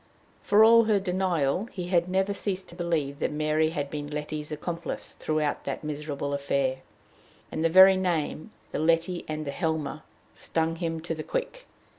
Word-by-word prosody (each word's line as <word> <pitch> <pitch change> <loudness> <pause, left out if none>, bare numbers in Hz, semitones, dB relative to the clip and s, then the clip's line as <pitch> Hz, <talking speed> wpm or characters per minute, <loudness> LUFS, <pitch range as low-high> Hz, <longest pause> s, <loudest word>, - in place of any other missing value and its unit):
For 210 +1 +5
all 230 +1 +7
her 215 -2 +3
denial, 180 -2 0
he 180 -2 -5
had 175 -1 +2
never 190 +2 +1
ceased 195 -2 -3
to 170 - -12
believe 160 -5 -1
that - - 0
Mary 155 +1 +1
had 145 -3 -4
been 145 -1 -4
Letty's 150 0 -4
accomplice 170 +2 -5
throughout 155 -2 -1
that - - -4
miserable 145 -1 -4
affair; 140 -2 0 0.7
and 155 - -2
the 165 - +4
very 190 +2 +8
name 175 -1 -1 0.2
the - - -2
Letty 165 +2 +1
and 155 0 -4
the 140 - -3
Helmer 155 0 -2 0.3
stung 165 0 -1
him 165 -2 -3
to 165 0 -3
the 155 - -5
quick. - - -4
165 Hz, 170 wpm, -27 LUFS, 150-185 Hz, 0.7 s, very